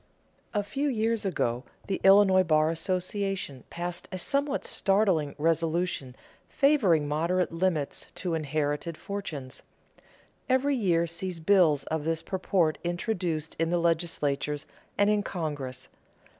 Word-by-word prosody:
A 205 -2 0
few 270 +9 -1
years 225 -3 0
ago 125 -9 -1 0.2
the 195 - -3
Illinois 195 -1 +7
Bar 155 -2 +3
Association 185 - -2
passed 175 +1 -4
a 185 - -4
somewhat 280 +7 0
startling 190 -7 +1
resolution 165 -4 0 0.3
favoring 210 - +3
moderate 170 +5 0
limits 165 -4 -1
to 180 -2 -2
inherited 155 +1 -2
fortunes. 155 -10 -6 0.9
Every 265 +2 +3
year 175 -8 +2
sees 170 +1 -4
bills 160 -5 +4
of 160 +1 -3
this 165 +1 -1
purport 185 -4 0
introduced 175 -3 -2
in 165 0 +1
the 175 - +2
legislatures 155 -4 0 0.3
and 205 - +4
in 210 0 +3
Congress. 145 -9 -4
170 Hz, 120 wpm, -28 LUFS, 155-195 Hz, 0.9 s, Illinois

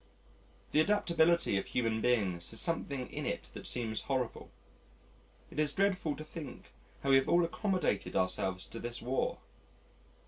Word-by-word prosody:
The - - +4
adaptability 170 - +3
of - - -6
human 115 -2 0
beings 95 -9 +2
has 115 - -3
something 140 -6 -1
in - - -3
it - - -3
that - - -7
seems 110 -3 -1
horrible. 130 -4 -2 1.0
It - - -5
is 150 -2 +3
dreadful 190 -6 +1
to 155 - -7
think 155 -4 -9 0.3
how 140 - +2
we 135 - +8
have 135 - +1
all 175 0 +5
accommodated 180 - -1
ourselves 95 0 0
to 115 - -8
this 120 0 -4
War. 130 +2 -1
135 Hz, 150 wpm, -33 LUFS, 110-165 Hz, 1.0 s, we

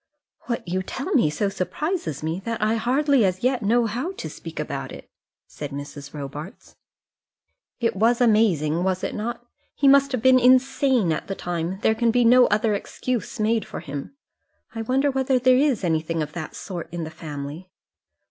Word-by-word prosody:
"What 235 -6 -3
you 185 +2 -1
tell 270 - -4
me 235 - +4
so 155 +7 -1
surprises 195 - -3
me, 160 +3 -2
that 230 -1 -3
I 215 +1 +2
hardly 260 +3 +2
as 185 0 0
yet 255 -1 +1
know 230 +3 +2
how 250 - -3
to 390 - -7
speak - - -9
about - - -4
it," - - -10 0.4
said 145 - -7
Mrs. 145 0 -8
Robarts. 150 - -8 1.0
"It 230 -4 0
was 230 +4 +3
amazing, 185 - +3
was 185 -1 -1
it - - -2
not? 235 +2 -4 0.3
He 280 - +2
must 275 0 +6
have 250 -3 -2
been 260 0 +6
insane 255 - +3
at 155 - -5
the 195 - -3
time; 175 +1 -3
there 220 - +4
can 230 +1 +1
be 240 +1 +3
no 250 +2 +7
other 215 +1 +1
excuse 245 +4 -3
made 220 0 +1
for - - -7
him. 145 - -7 0.6
I 225 - -4
wonder 265 +5 +1
whether 265 0 +1
there 255 0 +4
is 270 -7 +2
anything 160 -1 0
of 150 0 -8
that 160 -3 -6
sort 175 -3 -7
in 170 -1 -4
the 160 - -6
family?" 155 +2 -7
215 Hz, 185 wpm, -24 LUFS, 165-255 Hz, 1.0 s, no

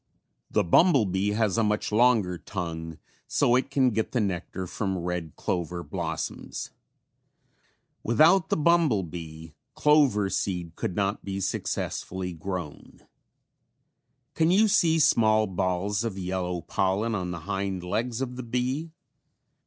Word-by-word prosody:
The - - +2
bumble 135 - +5
bee 95 +2 0
has 110 -1 +1
a - - +3
much 105 0 0
longer 105 -6 +3
tongue 80 -4 -5 0.3
so 120 - +3
it 130 +2 +1
can 135 -2 +3
get 110 0 -2
the 125 - +2
nectar 95 -2 -3
from 95 +1 -3
red 85 -2 -4
clover 85 0 -3
blossoms. 85 -4 -5 1.3
Without 160 - +4
the - - +1
bumble 155 - +3
bee 80 -1 -9 0.2
clover 140 -10 +4
seed 90 -4 -2
could 90 - -3
not 100 0 -1
be 95 0 -4
successfully 95 -1 -3
grown. 85 -2 -7 1.3
Can 160 0 +2
you 205 +5 +5
see 170 -6 +3
small 110 -7 +4
balls 95 +2 -1
of 110 -4 -3
yellow 90 -1 -2
pollen 95 +7 0
on 90 -4 -2
the 90 -2 -5
hind 95 0 -3
legs 115 +6 -2
of 125 -1 -4
the - - -4
bee? 125 +7 -2
100 Hz, 135 wpm, -27 LUFS, 90-125 Hz, 1.3 s, bumble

